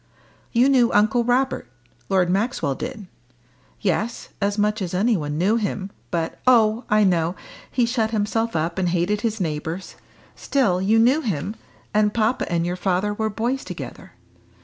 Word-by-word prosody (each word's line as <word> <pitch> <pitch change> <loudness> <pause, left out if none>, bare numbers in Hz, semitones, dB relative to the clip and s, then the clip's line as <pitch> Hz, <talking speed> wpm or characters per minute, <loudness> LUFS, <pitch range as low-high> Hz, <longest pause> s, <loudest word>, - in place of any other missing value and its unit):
"You 245 +2 +4
knew 255 -4 +4
Uncle 215 +4 +3
Robert 245 - 0 0.4
Lord 190 -2 +3
Maxwell 195 - 0
did?" 205 +9 -6 0.8
"Yes 210 +5 -1
as 200 +1 0
much 210 +1 +1
as 180 -1 -3
anybody 180 -8 +1
knew 195 +8 +2
him 200 -3 -3 0.2
but 165 -2 -2
" - - -32
"Oh, 220 +2 +1
I 210 0 +4
know: 175 -2 +2 0.4
he 245 -2 +2
shut 230 -2 0
himself 225 0 -1
up 165 +3 -1
and 180 -2 +1
hated 180 +4 0
his 220 -2 -1
neighbours. 160 +1 -3 0.4
Still 200 -10 +1
you 210 +4 +3
knew 250 +7 +4
him, 205 - -3 0.4
and 210 0 +2
papa 230 0 0
and 170 -1 +1
your 175 +1 -1
father 190 +2 0
were 220 +1 -1
boys 240 +6 -2
together. - - -8
210 Hz, 160 wpm, -23 LUFS, 180-230 Hz, 0.8 s, You